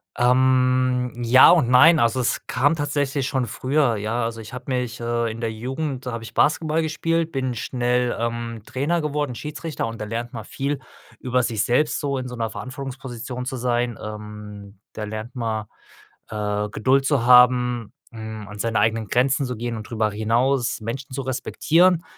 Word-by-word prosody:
Ähm, 125 0 +3
ja 120 +5 +7
und 160 -9 +4
nein, 155 +6 +7
also, 115 +2 +2
es 125 - -1
kam 145 +5 +2
tatsächlich 145 -2 -1
schon 130 -3 0
früher, 130 +1 +1
ja 110 +3 -1
also 115 0 -3
ich 110 - -10
habe 125 0 -7
mich, 125 -2 -2
äh, 120 0 -1
in 115 - -8
der 115 -1 -1
Jugend 130 +4 -4
da - - -2
habe 115 -1 -5
ich - - -10
Basketball 155 +1 +2
gespielt, 165 +1 -1
bin 130 -2 -2
schnell, 125 +1 0
ähm, 115 -1 -3
Trainer 155 +6 -1
geworden, 145 -4 -2
Schiedsrichter 150 +4 -4
und 115 -1 -7
da - - -3
lernt 115 +3 -4
mal 110 -2 -6
viel 140 +4 -3 0.4
über 125 0 0
sich 110 -3 0
selbst 150 +5 +1
so 140 -2 -1
in 130 -1 -4
so 125 - -7
'ner 115 -2 -2
Verantwortungsposition 125 +1 -6
zu 130 0 -4
sein. 120 -1 0
Ähm, 105 -2 -9
da 110 - -5
lernt 110 +3 -6
man, 110 -3 -2 0.6
äh, 105 -1 -2
Geduld 130 +6 +2
zu 135 -5 +1
haben, 125 -2 +5 0.2
hm, 110 -2 -7
an 105 - -9
seine 115 0 0
eigenen 110 -1 +1
Grenzen 130 +2 +2
zu 125 -1 -4
gehen 120 +1 -4
und 110 - -8
drüber 110 -2 0
hinaus 120 +4 +1
Menschen 130 +5 -5
zu 135 - -2
respektieren. 165 +7 +2
125 Hz, 180 wpm, -23 LUFS, 115-135 Hz, 0.6 s, ja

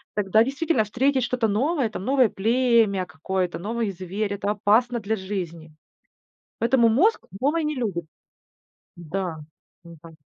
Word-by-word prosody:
тогда 210 +2 +3
действительно 275 -1 0
встретить 260 +4 +1
что-то 245 -2 0
новое 255 +4 0
там, 190 - -7
новое 260 -4 +3
племя 225 -3 +2
какое-то, 180 +4 -3
новый 220 +2 -2
зверь- 195 +3 -4
это 200 +1 -2
опасно 230 +4 +2
для 220 +1 -1
жизни. 170 -5 -6 0.8
Поэтому 235 0 +4
мозг 365 - +3 0.2
новое 310 +4 +1
не 300 -1 -1
любит. 195 -9 -3 0.9
Да. 175 0 -4 0.4
Не 170 -1 -13
пань 160 -1 -16
215 Hz, 135 wpm, -24 LUFS, 185-250 Hz, 0.9 s, Поэтому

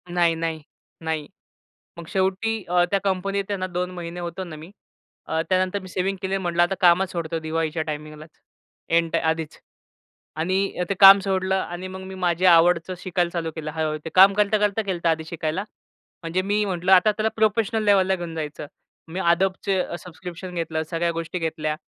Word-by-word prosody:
नाही, 170 -2 +3
नाही. 165 -1 -3 0.4
नाही. 160 -2 -3 0.7
मग 170 - -9
शेवटी 195 +3 0
अ, 175 0 +4
त्या 200 - +2
कंपनीत 195 +1 -1
आहे 200 - -1
ना 185 0 -3
2 180 0 -3
महिने 175 -1 -7
होतो 175 +1 -5
ना 170 -4 -8
मी. 160 +4 -11 0.6
अ, 160 - 0
त्यानंतर 185 +1 +1
मी 190 - -11
सेव्हिंग 190 +1 -2
केली. 190 0 -1
म्हटलं 175 -2 0
आता 175 +2 0
कामच 180 +1 +4
सोडतो 165 -1 -3
दिवाळीच्या 160 0 -2
टाईमिंगलाच. 155 0 -7 0.6
एन्ट 165 0 +2
आधीच 160 -1 -1 0.8
आणि 170 +4 0 0.2
अ, - - +2
ते - - +2
काम 195 0 +10
सोडलं 190 -1 0
आणि 185 -1 -4
मग 190 0 -8
मी 190 - -8
माझ्या 180 0 +3
आवडचं 170 +2 +3
शिकायला 175 -1 -1
चालू 165 -2 -3
केलं. 155 -1 -5
हळू-हळू 155 -1 -1
ते - - -3
काम 190 +2 +8
करता-करता 210 +1 +2
केलंत 185 -5 -4
आधी 160 -1 +1
शिकायला. 160 +3 -3 0.6
म्हणजे 165 +3 -1
मी 205 +2 0
म्हटलं, 185 -1 -1
आता 190 +3 +6
त्याला 215 +1 -1
प्रोफेशनल 220 +1 +1
लेवलला 190 -2 +4
घेऊन 175 -2 -6
जायचं. 150 -2 -5 0.4
मी 170 +3 -5
Adobeचे 185 +1 0
सबस्क्रिप्शन 180 +1 -9
घेतलं. 160 -2 -2
सगळ्या 170 0 0
गोष्टी 165 +2 -4
घेतल्या 155 -2 -2
180 Hz, 175 wpm, -23 LUFS, 165-190 Hz, 0.8 s, काम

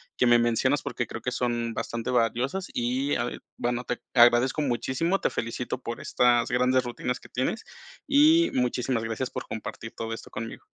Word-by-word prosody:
que 125 - +2
me 120 0 +7
mencionas, 120 +4 +2
porque 120 - -3
creo 110 - -7
que 125 - -1
son 120 -2 -1
bastante 115 +2 -3
valiosas 125 +9 0
y 120 - -1 0.3
ya 120 - +1
veo 120 - -5 0.2
bueno, 120 +1 -1
te 125 - -3
agradezco 120 +4 +5
muchísimo, 135 - 0
te - - +2
felicito 115 +2 -3
por 115 -1 -5
estas 120 0 +2
grandes 125 +1 +3
rutinas 125 +1 -3
que - - -15
tienes, 130 - -2 0.4
y 310 +4 +5
muchísimas 125 -1 0
gracias 115 +3 -3
por - - -6
compartir 110 +1 -6
todo 115 0 -4
esto 115 - -8
conmigo. 115 +1 -7
120 Hz, 180 wpm, -27 LUFS, 115-130 Hz, 0.4 s, me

